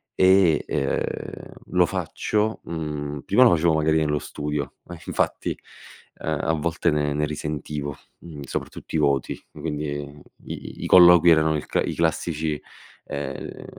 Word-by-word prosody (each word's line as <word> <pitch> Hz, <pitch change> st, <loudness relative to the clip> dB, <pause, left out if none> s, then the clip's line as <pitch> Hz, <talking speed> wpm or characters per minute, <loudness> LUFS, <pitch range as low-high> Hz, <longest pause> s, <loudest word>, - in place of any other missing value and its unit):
E, 95 Hz, -3 st, +5 dB
ehm, 70 Hz, -, -3 dB, 0.2 s
lo -, -, +4 dB
faccio, 110 Hz, +1 st, -1 dB
mhmm 75 Hz, -3 st, -4 dB
prima 125 Hz, +6 st, +5 dB
lo 125 Hz, -, +7 dB
facevo 85 Hz, 0 st, +3 dB
magari 80 Hz, 0 st, +2 dB
nello 75 Hz, -1 st, +1 dB
studio, 75 Hz, 0 st, -4 dB
ma 85 Hz, -, -9 dB
infatti, -, -, -1 dB, 0.6 s
ehm, 80 Hz, -2 st, -3 dB
a 80 Hz, -, +1 dB
volte 80 Hz, +2 st, 0 dB
ne 75 Hz, -1 st, 0 dB
ne 75 Hz, +1 st, 0 dB
risentivo, 75 Hz, -1 st, -4 dB, 0.2 s
mhmm, 80 Hz, -4 st, -10 dB
soprattutto 70 Hz, -, -6 dB
i -, -, +3 dB
voti, 70 Hz, -3 st, 0 dB
quindi 75 Hz, -2 st, -4 dB
i 70 Hz, 0 st, -9 dB
i -, -, -8 dB
i -, -, -2 dB
colloqui 90 Hz, -1 st, +8 dB
erano 80 Hz, -1 st, +4 dB
il 75 Hz, -, -3 dB
c -, -, 0 dB
i -, -, -3 dB
classici, 80 Hz, -2 st, -1 dB, 0.5 s
ehm, 70 Hz, -2 st, -6 dB
75 Hz, 150 wpm, -24 LUFS, 75-85 Hz, 0.6 s, colloqui